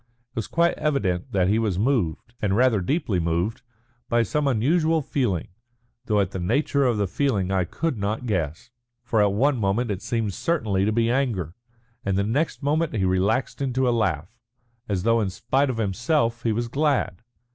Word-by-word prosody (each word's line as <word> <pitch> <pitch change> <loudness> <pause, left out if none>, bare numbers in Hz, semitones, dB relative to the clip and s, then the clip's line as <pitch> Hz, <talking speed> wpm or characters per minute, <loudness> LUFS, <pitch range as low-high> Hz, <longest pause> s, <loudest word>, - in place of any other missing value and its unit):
It - - -41
was 115 - -3
quite 170 +1 +2
evident 100 -13 0
that 95 -2 +2
he 105 +3 +2
was 105 -6 0
moved, 110 - 0
and 100 -2 +1
rather 120 -3 +3
deeply 110 - 0
moved, 85 +7 -1 0.5
by 120 -1 +3
some 150 +4 0
unusual 155 +6 +2
feeling, 115 - -1 0.6
though 105 -2 +2
at 95 -1 0
the 95 - -4
nature 140 - +1
of 120 -3 +2
the 100 - +1
feeling 100 -2 0
I 95 -2 +1
could 135 - -2
not 105 +5 -2
guess. 95 - -2 0.3
For 115 -3 +1
at 100 -1 +3
one 130 +7 +2
moment 105 +3 0
it 100 0 -3
seemed 115 -4 -2
certainly 105 - 0
to 110 - +2
be 115 +1 +2
anger, 115 - -1 0.5
and 95 -1 0
the 100 - +2
next 140 +9 -1
moment 155 0 +1
he 95 -3 +1
relaxed 95 +9 0
into 130 -1 +1
a - - +3
laugh, 95 -4 -1 0.5
as 95 -3 -1
though 115 +1 +3
in 100 - 0
spite 130 +8 0
of 125 - -2
himself 115 - 0
he 115 - 0
was 120 +2 -1
glad. 140 - 0
115 Hz, 190 wpm, -24 LUFS, 95-130 Hz, 0.6 s, rather